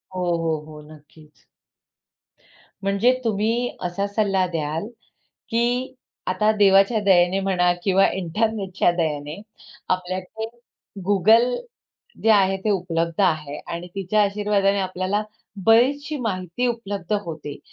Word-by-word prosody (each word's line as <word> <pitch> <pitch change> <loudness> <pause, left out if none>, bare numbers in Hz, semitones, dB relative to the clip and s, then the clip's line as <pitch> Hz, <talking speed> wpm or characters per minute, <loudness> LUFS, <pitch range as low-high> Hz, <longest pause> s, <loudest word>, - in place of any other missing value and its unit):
हो, 185 - -2 0.2
हो, 160 -1 0
हो. 155 -1 -11
नक्कीच. 150 0 -18 1.4
म्हणजे 200 +5 +3
तुम्ही 225 +3 0
असा 180 +3 -2
सल्ला 200 -3 +1
द्याल, 160 +3 -2 0.6
की 245 +3 0 0.3
आता 200 +4 +2
देवाच्या 195 +2 +5
दयेने 185 -1 +4
म्हणा 180 -2 +2
किंवा 195 0 +4
इंटरनेटच्या 190 0 0
दयेने 150 +2 -2 0.5
आपल्याकडे 185 +4 -3 0.6
Google 220 +6 +4 0.7
जे 225 - +3
आहे, 195 -2 +4
ते 210 +3 -2
उपलब्ध 170 -2 -1
आहे 155 -5 0
आणि 170 +1 -5
तिच्या 195 +2 +1
आशीर्वादाने 200 -1 +1
आपल्याला 185 +2 -1 0.4
बरीचशी 280 +6 +3
माहिती 195 +1 -2
उपलब्ध 205 -5 -3
होते. 155 -3 -7
195 Hz, 110 wpm, -23 LUFS, 175-215 Hz, 1.4 s, देवाच्या